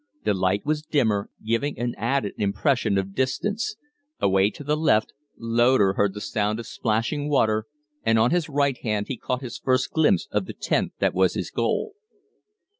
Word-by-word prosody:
The -, -, +2 dB
light 95 Hz, +1 st, 0 dB
was 150 Hz, 0 st, 0 dB
dimmer, 115 Hz, -10 st, 0 dB, 0.2 s
giving 115 Hz, +6 st, 0 dB
an 120 Hz, 0 st, -2 dB
added 115 Hz, -2 st, -1 dB
impression 105 Hz, +1 st, +1 dB
of 95 Hz, 0 st, -2 dB
distance; 205 Hz, -, -1 dB, 0.4 s
away 95 Hz, +1 st, +3 dB
to 145 Hz, -, -10 dB
the 150 Hz, +2 st, +1 dB
left, 150 Hz, -9 st, +2 dB, 0.2 s
Loder 115 Hz, -3 st, +3 dB
heard 100 Hz, 0 st, +1 dB
the -, -, -5 dB
sound 105 Hz, +1 st, -1 dB
of 115 Hz, -, -6 dB
splashing 120 Hz, +7 st, -1 dB
water, 110 Hz, -6 st, +2 dB, 0.4 s
and 115 Hz, 0 st, +3 dB
on 115 Hz, +3 st, +3 dB
his 175 Hz, -3 st, +1 dB
right 140 Hz, -2 st, +1 dB
hand 105 Hz, -2 st, -2 dB
he 135 Hz, -, -2 dB
caught 125 Hz, +3 st, -3 dB
his 120 Hz, -, -6 dB
first 130 Hz, 0 st, +1 dB
glimpse 160 Hz, -1 st, +2 dB
of -, -, -1 dB
the -, -, -6 dB
tent -, -, -1 dB
that -, -, +1 dB
was -, -, +2 dB
his -, -, -3 dB
goal. 435 Hz, -, -1 dB
115 Hz, 180 wpm, -24 LUFS, 105-140 Hz, 0.4 s, away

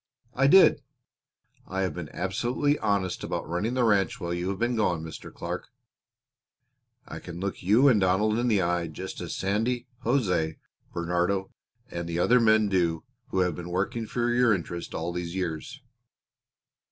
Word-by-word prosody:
I 135 Hz, +1 st, +3 dB
did. 185 Hz, -2 st, +7 dB, 0.9 s
I 95 Hz, +1 st, -2 dB
have 95 Hz, -, -1 dB
been 85 Hz, -4 st, -6 dB
absolutely 120 Hz, +10 st, 0 dB
honest 100 Hz, -3 st, 0 dB
about -, -, -3 dB
running 95 Hz, +9 st, -1 dB
the 125 Hz, -, +2 dB
ranch 100 Hz, -6 st, +2 dB
while 85 Hz, 0 st, -3 dB
you 85 Hz, +2 st, -2 dB
have 100 Hz, -, -2 dB
been 120 Hz, +3 st, 0 dB
gone, 90 Hz, -7 st, 0 dB
Mr. 80 Hz, -, -8 dB
Clark. 90 Hz, +1 st, -5 dB, 1.4 s
I -, -, -7 dB
can 85 Hz, -1 st, -8 dB
look 100 Hz, +1 st, -4 dB
you 110 Hz, +9 st, +5 dB
and 115 Hz, -7 st, +5 dB
Donald 105 Hz, +4 st, +2 dB
in 120 Hz, -, +1 dB
the 105 Hz, -5 st, +3 dB
eye 85 Hz, 0 st, 0 dB
just 75 Hz, -, -7 dB
as -, -, -4 dB
Sandy, 115 Hz, +6 st, -1 dB, 0.2 s
José, 95 Hz, -, +1 dB, 0.3 s
Bernardo, 90 Hz, +3 st, -1 dB, 0.4 s
and 85 Hz, 0 st, -4 dB
the 85 Hz, -, -2 dB
other 120 Hz, +8 st, +4 dB
men 110 Hz, -2 st, +4 dB
do 85 Hz, -4 st, +1 dB, 0.2 s
who 95 Hz, -, 0 dB
have 90 Hz, -2 st, +1 dB
been 90 Hz, +1 st, -7 dB
working 100 Hz, +5 st, -2 dB
for 120 Hz, +1 st, 0 dB
your 120 Hz, -3 st, +4 dB
interest 85 Hz, -1 st, -6 dB
all 85 Hz, +2 st, -3 dB
these 90 Hz, 0 st, -4 dB
years." 85 Hz, -5 st, -4 dB
95 Hz, 165 wpm, -27 LUFS, 85-115 Hz, 1.4 s, did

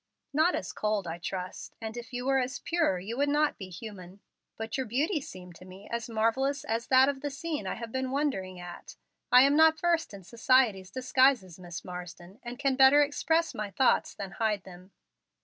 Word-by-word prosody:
"Not 315 Hz, +5 st, +3 dB
as 185 Hz, -, -4 dB
cold, 210 Hz, -2 st, -1 dB
I 170 Hz, 0 st, -5 dB
trust, 180 Hz, +1 st, -6 dB
and 220 Hz, 0 st, -6 dB
if 240 Hz, -1 st, -8 dB
you 245 Hz, 0 st, -4 dB
were 270 Hz, 0 st, +3 dB
as 260 Hz, +1 st, -2 dB
pure 330 Hz, -, 0 dB
you 200 Hz, +6 st, -5 dB
would 285 Hz, +1 st, +2 dB
not 295 Hz, +1 st, +1 dB
be 190 Hz, -2 st, -7 dB
human. 185 Hz, -1 st, -10 dB, 0.4 s
But 225 Hz, +1 st, -4 dB
your 265 Hz, -2 st, -2 dB
beauty 295 Hz, -, 0 dB
seemed 180 Hz, -7 st, -10 dB
to -, -, -14 dB
me 185 Hz, +2 st, -13 dB
as 235 Hz, 0 st, -3 dB
marvellous 245 Hz, +6 st, 0 dB
as 230 Hz, +1 st, -2 dB
that 260 Hz, 0 st, +6 dB
of 275 Hz, -1 st, -2 dB
the 290 Hz, -, -2 dB
scene 290 Hz, -, -4 dB
I -, -, -2 dB
had 230 Hz, 0 st, -7 dB
been 260 Hz, +1 st, -2 dB
wondering 255 Hz, -10 st, -2 dB
at. 175 Hz, 0 st, -10 dB, 0.4 s
I 250 Hz, +1 st, +8 dB
am 280 Hz, +1 st, +4 dB
not 320 Hz, 0 st, +5 dB
versed 335 Hz, -3 st, +1 dB
in 200 Hz, -2 st, -10 dB
society's 230 Hz, -3 st, +2 dB
disguises, 250 Hz, -5 st, +2 dB
Miss 175 Hz, -1 st, -8 dB
Marsden, 180 Hz, +2 st, -9 dB
and 240 Hz, +1 st, -7 dB
can 275 Hz, -2 st, +1 dB
better 270 Hz, +2 st, +7 dB
express 320 Hz, +3 st, 0 dB
my 210 Hz, -3 st, -4 dB
thoughts 260 Hz, +6 st, +2 dB
than 195 Hz, -1 st, -6 dB
hide 210 Hz, 0 st, -1 dB
them. 185 Hz, 0 st, -13 dB
235 Hz, 200 wpm, -29 LUFS, 190-275 Hz, 0.4 s, I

